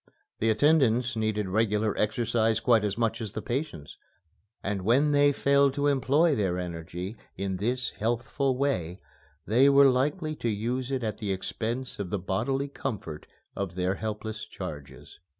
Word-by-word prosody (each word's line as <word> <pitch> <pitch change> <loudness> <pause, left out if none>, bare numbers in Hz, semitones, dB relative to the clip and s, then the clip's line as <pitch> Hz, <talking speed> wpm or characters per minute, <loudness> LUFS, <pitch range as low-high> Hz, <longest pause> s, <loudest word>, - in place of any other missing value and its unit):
The 115 - +2
attendants 125 -1 +3
needed 110 -2 -1
regular 105 +1 +1
exercise 115 0 +1
quite 115 -2 +3
as 105 0 -1
much 115 -1 0
as 110 - -5
the 110 - -4
patients 120 - -4 0.6
and 100 0 -2
when 130 +9 +3
they 145 0 +5
failed 140 -1 +3
to 145 - 0
employ 145 +3 +3
their 95 -8 0
energy 90 +3 -5 0.2
in 95 0 -2
this 125 +6 -1
healthful 120 +4 -1
way, 95 - -1 0.5
they 125 +6 +5
were 140 -1 +7
likely 150 +5 0
to 120 - -1
use 120 +5 -2
it 135 -2 -2
at 110 -2 -3
the 105 -3 -2
expense 115 +7 -4
of 100 -3 -3
the 105 - -1
bodily 120 +10 -1
comfort 110 - -6 0.3
of 95 -3 -4
their 90 0 0
helpless 110 +1 -5
charges. 75 -8 -9
115 Hz, 155 wpm, -28 LUFS, 100-135 Hz, 0.6 s, were